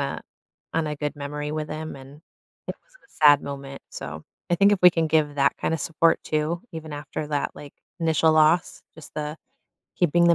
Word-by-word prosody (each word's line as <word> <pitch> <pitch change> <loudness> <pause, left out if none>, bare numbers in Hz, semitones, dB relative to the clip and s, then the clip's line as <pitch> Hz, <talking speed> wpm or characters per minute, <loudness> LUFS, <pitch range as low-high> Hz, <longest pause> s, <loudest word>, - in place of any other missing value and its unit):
a - - -3 0.5
on 165 -1 +1
a 150 -1 -3
good 150 +1 -3
memory 145 +1 -4
with 155 0 -3
him, 155 +1 -5
and 135 +4 -13 0.5
it - - -2
wasn't - - -26
a - - -29
sad 145 -1 +7
moment, 140 -1 -7
so, 75 +2 -7 0.3
I 175 - +3
think 200 +3 +5
if 205 - +2
we 180 - +10
can 165 -2 +1
give 150 -2 +2
that 140 0 +3
kind - - -1
of 160 - -3
support 165 +1 +2
too, 155 +3 -1
even 160 -1 -7
after 150 +1 -5
that, 145 -2 -1
like, 145 -1 -11 0.3
initial 160 -1 +3
loss, 155 +2 +3
just 160 - -13
the 150 0 -4 0.6
keeping 175 -1 +3
the 170 - +6
155 Hz, 205 wpm, -25 LUFS, 145-165 Hz, 0.6 s, we